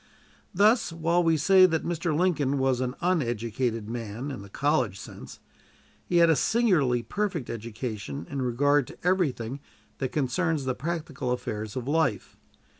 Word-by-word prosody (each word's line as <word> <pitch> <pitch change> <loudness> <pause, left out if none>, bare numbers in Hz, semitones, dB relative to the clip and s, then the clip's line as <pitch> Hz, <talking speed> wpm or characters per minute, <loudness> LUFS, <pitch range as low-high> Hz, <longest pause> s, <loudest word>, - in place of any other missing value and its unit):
Thus, 215 +3 +3
while 165 +1 +1
we 165 -2 +3
say 185 +5 +6
that 160 -3 -1
Mr. 165 -2 -1
Lincoln 150 -6 +1
was 130 -2 +1
an 125 0 -2
uneducated 120 - -1
man 115 +3 -5
in 130 - -6
the 100 - -11
college 130 -6 0
sense, - - -10 0.7
he 175 - +1
had 170 0 +6
a - - +4
singularly 155 - +2
perfect 170 - -2
education 110 - -5
in 140 - -4
regard 140 +2 +2
to - - -12
everything 145 -9 0 0.4
that 130 -2 -2
concerns 150 +2 0
the 130 - 0
practical 150 -2 -4
affairs 110 -4 -4
of 130 -1 -4
life. 145 - 0
140 Hz, 150 wpm, -27 LUFS, 120-165 Hz, 0.7 s, say